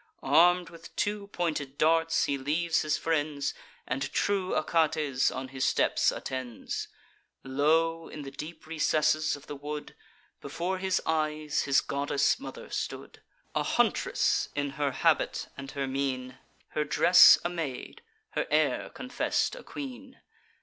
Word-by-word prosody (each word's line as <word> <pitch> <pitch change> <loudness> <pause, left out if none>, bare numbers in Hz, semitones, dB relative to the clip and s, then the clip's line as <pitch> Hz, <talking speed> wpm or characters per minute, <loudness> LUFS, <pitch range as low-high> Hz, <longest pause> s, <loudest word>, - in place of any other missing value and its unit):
Arm'd 175 +5 +4
with 170 0 -13
two 205 -1 -1
pointed 155 -8 -3
darts, 165 +1 +3
he 140 - 0
leaves 155 +5 0
his 150 -1 0
friends, 150 -3 -1 0.3
And 135 +2 -3
true 195 -2 0
Achates 155 -4 +1
on 130 0 -5
his 130 -1 -4
steps - - +2
attends. 130 -3 -5 0.6
Lo! 160 +5 +1
in 150 - -8
the 135 - -8
deep 155 +4 -8
recesses 155 -1 +1
of 145 - -13
the 145 - -7
wood, 150 +1 -6 0.5
Before 185 +2 -3
his 190 -1 0
eyes 155 -1 0
his 140 -1 +4
goddess 140 0 0
mother - - -9
stood: - - -5 0.3
A - - +1
huntress - - +1
in 145 -1 -1
her 145 0 -1
habit - - +1
and 135 -1 -8
her 140 -1 -2
mien; 130 -1 -3 0.3
Her 150 - -1
dress 175 +4 +8
a - - +1
maid, 160 -7 -5 0.3
her - - -2
air - - +1
confess'd - - -1
a - - -9
queen. 265 -1 -8
150 Hz, 140 wpm, -29 LUFS, 140-165 Hz, 0.6 s, dress